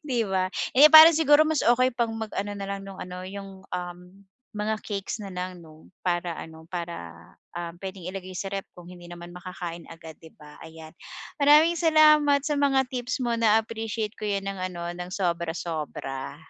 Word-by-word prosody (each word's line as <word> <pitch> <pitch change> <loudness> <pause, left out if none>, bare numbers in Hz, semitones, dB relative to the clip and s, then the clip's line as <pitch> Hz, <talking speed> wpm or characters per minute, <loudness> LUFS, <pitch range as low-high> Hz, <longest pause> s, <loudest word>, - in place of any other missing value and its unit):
Di 255 -5 -1
ba, 185 -1 0 0.3
eh, 300 +3 +9
parang 315 +1 +10
siguro 310 -1 +5
mas 315 -2 0
okey 250 +1 +3
pag 235 -2 0
mag 220 -1 -6
ano 205 +1 -2
na 200 -1 -5
lang 200 0 -4
nung 195 -1 -10
ano 180 0 -7
yung 195 0 -9
um, 175 0 -6 0.5
mga 210 +1 -1
cakes 205 +1 -4
na 195 - -7
lang 180 0 -5
'no 155 0 -17 0.2
para 175 -2 -1
ano 160 0 -10
para 170 -1 -5 0.6
ah, 170 -1 -5
pwedeng 190 -2 -7
ilagay 185 0 -7
si 195 - -3
ref 195 -1 -4
kung 175 - -12
hindi 175 -1 -12
naman 175 0 -10
makakain 175 -1 -7
agad 165 -1 -11
'di 160 - -13
ba 150 0 -15
ayan, 160 -1 -12 0.5
maraming 300 +4 +6
salamat 305 -3 +5
sa 300 - -1
mga 270 -2 +3
tips 250 +1 -3
mo 240 - 0
na-appreciate 220 -1 0
ko 215 - -4
'yan 200 -1 -1
ng 195 -1 -5
ano 175 -1 -7
ng 175 0 -7
sobra-sobra. 165 -6 -3
195 Hz, 180 wpm, -26 LUFS, 175-235 Hz, 0.6 s, parang